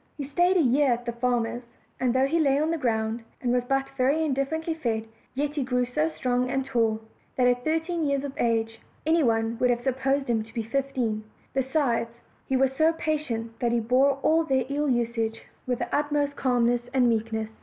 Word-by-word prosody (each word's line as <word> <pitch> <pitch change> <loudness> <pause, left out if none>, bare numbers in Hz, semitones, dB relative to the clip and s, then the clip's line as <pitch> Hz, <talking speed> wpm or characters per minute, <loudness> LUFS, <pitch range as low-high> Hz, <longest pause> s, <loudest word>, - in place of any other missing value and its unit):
He 290 - -3
stayed 350 +7 +2
a 340 - +4
year 270 +1 +3
at 240 +1 -5
the 235 - -1
farmer's; 240 0 -1 0.4
and 255 -2 +2
though 260 +2 +3
he 325 +5 +1
lay 280 -3 +3
on 310 +2 +1
the 330 - 0
ground, 225 -2 0 0.2
and 245 - -1
was 245 0 +2
but 270 +1 0
very 275 +4 +1
indifferently 310 +4 -1
fed, 230 -8 -2 0.3
yet 290 +2 0
he 295 -3 -1
grew 250 -1 0
so 300 +6 0
strong 250 -4 -1
and 270 0 -1
tall 225 -4 +1 0.3
that 250 - +2
at 245 0 +2
thirteen 325 +1 0
years 280 -1 0
of 280 -1 -5
age 225 -1 0 0.3
any 325 +1 +3
one 225 -3 +1
would 250 - +3
have 240 0 0
supposed 270 +1 0
him 230 -2 +1
to 225 +1 -11
be 230 - -1
fifteen: 235 -3 -1 0.3
besides, 265 -3 0 0.4
he 265 - +1
was 265 0 +2
so 320 +3 +4
patient 255 -9 -3
that 240 -1 +1
he 235 - +2
bore 260 +4 +3
all 325 +1 +4
their 265 -5 +1
ill 290 +1 0
usage 230 -2 -1 0.2
with 250 -1 0
the 240 0 -2
ut 295 0 0
most 285 -1 0
calmness 245 -2 +2
and 250 -2 +4
meekness. 220 -1 -1
255 Hz, 210 wpm, -26 LUFS, 235-285 Hz, 0.4 s, a